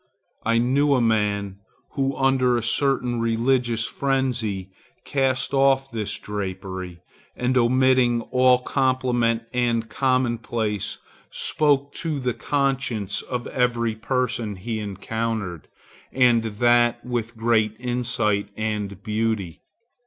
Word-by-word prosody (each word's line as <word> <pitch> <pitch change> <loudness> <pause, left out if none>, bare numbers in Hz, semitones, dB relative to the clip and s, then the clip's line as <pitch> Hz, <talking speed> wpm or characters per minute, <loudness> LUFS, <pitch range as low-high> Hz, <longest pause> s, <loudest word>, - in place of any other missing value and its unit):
I 115 +1 +2
knew 140 +4 +3
a - - +2
man 105 -4 0 0.3
who 135 -1 -1
under 130 -2 +3
a 120 - -2
certain 125 0 +1
religious 115 0 +1
frenzy 120 -8 -1 0.3
cast 135 -1 0
off 135 0 +3
this 110 -2 -3
drapery, 95 -3 -6 0.3
and 125 +1 0
omitting 125 -1 +3
all 125 0 +5
compliment 125 -3 +1
and 120 -2 0
commonplace, 120 -5 -1 0.3
spoke 145 -2 +1
to 160 -4 -2
the 125 -2 -1
conscience 135 -9 -1
of 125 -1 -4
every 120 -2 0
person 115 -2 -2
he 110 +4 -4
encountered, 105 -3 -4 0.4
and 120 -3 +3
that 120 +2 +2
with 120 -2 -3
great 110 -2 +2
insight 120 -5 0
and 105 -3 -3
beauty. 105 -5 -2
120 Hz, 110 wpm, -23 LUFS, 110-130 Hz, 0.4 s, all